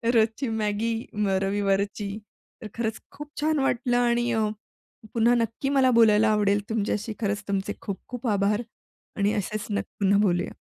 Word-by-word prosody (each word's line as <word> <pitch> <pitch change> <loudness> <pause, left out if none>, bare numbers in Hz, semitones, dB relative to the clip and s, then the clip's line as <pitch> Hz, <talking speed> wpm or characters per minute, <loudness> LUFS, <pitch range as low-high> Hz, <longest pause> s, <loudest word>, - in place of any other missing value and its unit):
रोजची 225 +4 +2
मॅगी 220 +1 -1 0.2
मग 200 -2 +1
रविवारची. 200 +1 0 0.5
तर 220 - -6
खरंच 225 -2 -2
खूप 295 0 -9
छान 310 -1 +2
वाटलं 245 -2 +1
आणि 240 0 +2
अ, 220 -1 +2 0.7
पुन्हा 235 +1 +4
नक्की 230 +3 -1
मला 270 -2 +4
बोलायला 220 -2 +5
आवडेल 205 -1 +2
तुमच्याशी 220 0 -1
खरंच 205 -1 -1
तुमचे 200 0 -1
खूप 200 -2 -4
खूप 245 0 -5
आभार 205 +1 +2 0.6
आणि 200 +1 +2
असेच 215 +1 -3
न 205 -1 0 0.2
पुन्हा 200 0 +3
बोलूया. 180 -4 +1
215 Hz, 150 wpm, -26 LUFS, 205-235 Hz, 0.7 s, बोलायला